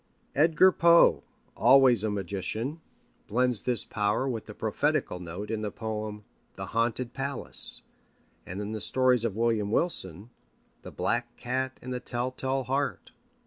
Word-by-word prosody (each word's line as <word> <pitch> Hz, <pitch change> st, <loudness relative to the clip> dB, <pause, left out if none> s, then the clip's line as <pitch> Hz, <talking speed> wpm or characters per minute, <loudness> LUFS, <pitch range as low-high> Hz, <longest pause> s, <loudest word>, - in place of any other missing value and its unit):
Edgar 160 Hz, +5 st, +5 dB
Poe, 170 Hz, -1 st, +5 dB, 0.3 s
always 125 Hz, -2 st, +6 dB
a 110 Hz, -, 0 dB
magician, 105 Hz, -, -3 dB, 0.5 s
blends 125 Hz, -1 st, +1 dB
this 120 Hz, -4 st, +2 dB
power 105 Hz, +4 st, 0 dB
with 115 Hz, -4 st, -4 dB
the -, -, -9 dB
prophetical 90 Hz, -, -1 dB
note 90 Hz, +5 st, -6 dB
in 110 Hz, -1 st, -2 dB
the 105 Hz, -, -2 dB
poem, 105 Hz, 0 st, -5 dB, 0.3 s
The -, -, -6 dB
Haunted 115 Hz, +2 st, +1 dB
Palace, 140 Hz, -1 st, -2 dB, 0.6 s
and 90 Hz, +3 st, -7 dB
in 105 Hz, +1 st, -4 dB
the 110 Hz, -1 st, -4 dB
stories 130 Hz, -1 st, +2 dB
of 105 Hz, -4 st, -2 dB
William 115 Hz, -2 st, +1 dB
Wilson, 105 Hz, -, -2 dB, 0.5 s
The -, -, -9 dB
Black 120 Hz, 0 st, -2 dB
Cat 130 Hz, +2 st, -3 dB
and 130 Hz, 0 st, -5 dB
The 125 Hz, -, -3 dB
Tell 125 Hz, 0 st, -3 dB
tale 130 Hz, +1 st, -1 dB
Heart. 135 Hz, +3 st, -2 dB
120 Hz, 145 wpm, -28 LUFS, 105-130 Hz, 0.6 s, always